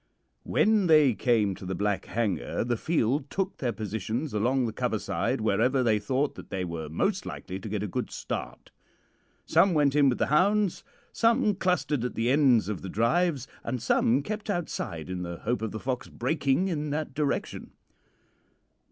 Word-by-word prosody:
"When 215 -3 +2
they 155 -5 +6
came 110 -4 +2
to 95 - -11
the 95 0 -3
Black 100 +1 -1
Hanger 105 - -1
the 120 +1 0
field 140 0 0
took 195 0 -2
their 125 -3 -1
positions 110 +6 -3
along 125 +5 +1
the 110 - -3
cover - - -1
side - - -1
wherever 115 +5 +2
they 110 -3 +3
thought 130 +7 0
that - - -11
they 95 -1 -2
were 80 -3 -5
most 185 - 0
likely 95 +1 -6
to 110 - -7
get 105 0 -2
a - - -2
good - - -3
start. - - -6 0.7
Some 190 -3 +4
went 145 -2 +3
in 145 -2 +5
with 125 - 0
the - - +1
hounds, 200 +3 +2 0.3
some 230 -1 +3
clustered 155 -9 0
at 125 - -3
the 115 +2 +1
ends 135 -7 +4
of 105 -4 -3
the 95 - -6
drives, 135 - +1 0.2
and 130 - -3
some 125 +4 +2
kept 215 +4 -5
outside 155 - -3
in 90 -1 -4
the 85 -1 -5
hope 120 +6 -2
of 110 - -2
the 110 - -5
fox 125 0 -3
breaking 140 +6 0
in 150 -4 -2
that 150 -1 -3
direction. 145 0 -2
130 Hz, 180 wpm, -27 LUFS, 105-155 Hz, 0.7 s, they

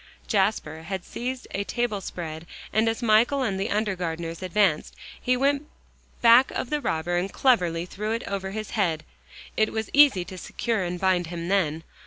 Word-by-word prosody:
Jasper 195 -6 0
had 190 +2 -5
seized 255 +1 -5
a 200 - -2
table 230 -2 -2
spread, 165 -2 -6 0.3
and 220 +1 +3
as 225 +2 -3
Michael 235 +5 +4
and 195 -6 -1
the 195 - -1
undergardeners 175 -5 -2
advanced, 185 -3 +1 0.3
he 250 0 +2
went 280 +2 +1 0.6
back 235 +3 +7
of 250 - -4
the 300 -1 0
robber, 175 - -1
and 185 +2 -1
cleverly 175 -10 +2
threw 210 +4 -4
it 230 +1 -2
over 195 -1 -3
his 215 +2 -5
head. 170 -8 0 0.5
It 215 - +2
was 220 -1 -3
easy 280 -11 +6
to 185 0 -9
secure 230 +2 -2
and 175 -1 -3
bind 185 -2 +2
him 170 0 -5
then. 165 -5 +1
195 Hz, 175 wpm, -25 LUFS, 175-230 Hz, 0.6 s, back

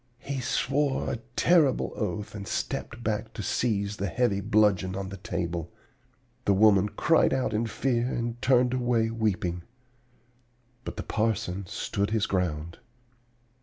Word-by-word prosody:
He 135 +2 -4
swore 135 +2 0
a 125 - -2 0.2
terrible 160 -7 +3
oath 105 -1 -3
and 100 -2 -7
stepped 115 +1 -3
back 110 +1 -2
to 105 - -5
seize 100 -2 0
the 100 - -1
heavy 100 +1 +1
bludgeon 100 -3 +2
on 95 0 -4
the 100 - -7
table. 85 -2 -3 0.7
The 100 - +4
woman 105 -1 +5
cried 160 +2 +3
out 130 - -1
in 110 +2 0
fear 120 +2 0
and 120 -2 -3
turned 125 -1 +3
away 120 -3 +1
weeping. 95 -6 -1 1.2
But - - -6
the - - -3
parson 100 -4 -1
stood 100 +3 -2
his 110 -1 +1
ground. 85 -2 -2
110 Hz, 140 wpm, -27 LUFS, 95-120 Hz, 1.2 s, woman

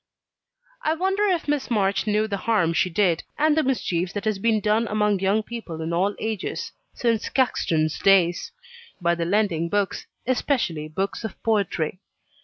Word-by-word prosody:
I 310 +1 +1
wonder 385 +4 0
if 355 -5 0
Miss 290 -2 -1
March 200 -2 +1
knew 215 +1 +2
the 200 -2 -2
harm 180 -7 +3
she 180 - +2
did, 175 -2 +2 0.2
and 305 0 +3
the 315 - +3
mischief 185 - -1
that 205 +1 -4
has 215 -2 0
been 220 +1 +2
done 215 +2 +1
among 210 -1 +1
young 195 +3 +2
people 215 -9 -7
in 160 +1 -3
all 195 +4 +1
ages 220 -3 -3 0.2
(since 230 -3 0
Caxton's 160 - +1
days), 185 - +3 0.5
by 170 -1 +2
the 170 -1 -2
lending 175 -3 +1
books, 205 -1 -1 0.2
especially 235 - 0
books 190 +8 -3
of 220 - -5
poetry. 190 -6 0
205 Hz, 165 wpm, -24 LUFS, 175-230 Hz, 0.5 s, harm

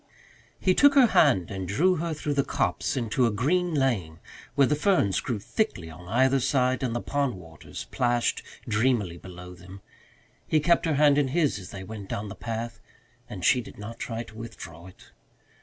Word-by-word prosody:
He 185 - +3
took 285 +7 +5
her 270 -3 +8
hand 125 - +3
and 95 -2 -4
drew 175 - +2
her 170 +1 -2
through 150 0 -2
the 140 -1 +2
copse - - -1
into 120 0 +1
a - - 0
green 170 - 0
lane, 110 - 0 0.4
where 140 -1 +5
the 150 - +1
ferns 150 - +2
grew 120 - -2
thickly 100 - -2
on 90 +2 -12
either 130 +6 +3
side 130 -1 +1
and 125 -3 -1
the 120 - -1
pond 140 -5 -1
waters 80 -4 -10
plashed 120 -1 +1 0.3
dreamily 105 -6 +1
below 90 -1 -10
them. 95 +2 -13 0.7
He 155 - +3
kept 170 +2 +2
her 155 - +1
hand 145 0 +5
in 145 - +2
his 145 -4 +1
as 90 - -10
they 95 -1 -8
went 100 0 -8
down 105 +1 -4
the - - -8
path, 115 0 -5 0.5
and 90 - -5
she 130 -2 +4
did - - -12
not 105 +3 -8
try 115 -1 -4
to 110 - -15
withdraw 85 -7 -9
it. 90 - -17
120 Hz, 190 wpm, -26 LUFS, 95-145 Hz, 0.7 s, her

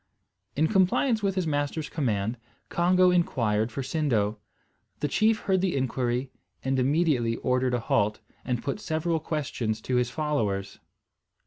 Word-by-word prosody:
In 155 - +3
compliance 215 - +2
with 195 -2 0
his 185 -2 0
master's 145 0 -1
command, 115 -6 -1 0.3
Congo 180 +1 +4
inquired 115 -10 +1
for 135 - -4
Sindo. 125 -8 0 0.6
The 150 - 0
chief 220 +8 +2
heard 190 -2 +1
the 185 -4 0
inquiry 130 -1 -1 0.3
and 135 0 +1
immediately 135 -4 +2
ordered 125 0 +1
a - - 0
halt, 105 -1 +1 0.2
and 125 -2 -2
put 140 - -2
several 160 -3 -1
questions 130 -8 -2
to 125 +2 0
his 125 -1 +1
followers. 125 -9 -2
140 Hz, 140 wpm, -27 LUFS, 120-170 Hz, 0.6 s, Congo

